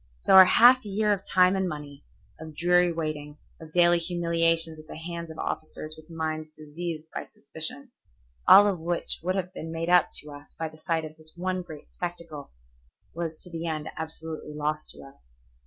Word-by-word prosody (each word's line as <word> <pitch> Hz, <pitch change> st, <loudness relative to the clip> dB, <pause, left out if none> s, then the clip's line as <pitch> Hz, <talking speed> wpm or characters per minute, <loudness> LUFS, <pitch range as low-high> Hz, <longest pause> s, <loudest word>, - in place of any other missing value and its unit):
So -, -, +2 dB
our 190 Hz, 0 st, +11 dB
half 245 Hz, +7 st, +6 dB
year 210 Hz, +1 st, +1 dB
of 195 Hz, -1 st, -5 dB
time 185 Hz, +1 st, +4 dB
and 190 Hz, -1 st, 0 dB
money, 145 Hz, -2 st, -8 dB, 0.4 s
of 160 Hz, -1 st, -9 dB
dreary 175 Hz, 0 st, +3 dB
waiting, 155 Hz, -2 st, -4 dB, 0.2 s
of 160 Hz, -1 st, -12 dB
daily 175 Hz, 0 st, +4 dB
humiliations 165 Hz, -2 st, +1 dB
at 155 Hz, -, -14 dB
the -, -, -9 dB
hands 170 Hz, 0 st, -6 dB
of 160 Hz, -, -10 dB
officers 155 Hz, 0 st, -5 dB
with 155 Hz, +1 st, -16 dB
minds 155 Hz, -1 st, -4 dB
diseased 155 Hz, +1 st, -6 dB
by -, -, -5 dB
suspicion, 250 Hz, -, -5 dB, 0.6 s
all 205 Hz, +1 st, +10 dB
of 195 Hz, -4 st, 0 dB
which 170 Hz, +1 st, -1 dB
would 185 Hz, +3 st, -1 dB
have 185 Hz, -1 st, -3 dB
been 160 Hz, -3 st, -7 dB
made 165 Hz, +1 st, -2 dB
up 180 Hz, -1 st, +5 dB
to 150 Hz, -, -11 dB
us 145 Hz, 0 st, -13 dB
by 160 Hz, -1 st, -3 dB
the 155 Hz, -, -16 dB
sight 165 Hz, -1 st, -1 dB
of 155 Hz, 0 st, -11 dB
this 155 Hz, 0 st, -11 dB
one 185 Hz, +1 st, -2 dB
great 155 Hz, -4 st, -12 dB
spectacle, 170 Hz, -5 st, -7 dB, 0.6 s
was 165 Hz, -1 st, -4 dB
to 180 Hz, -, -11 dB
the 165 Hz, 0 st, -4 dB
end 155 Hz, -1 st, -3 dB
absolutely 160 Hz, -1 st, -7 dB
lost 150 Hz, +1 st, -2 dB
to -, -, -10 dB
us. 135 Hz, -, -18 dB
165 Hz, 190 wpm, -27 LUFS, 155-175 Hz, 0.6 s, our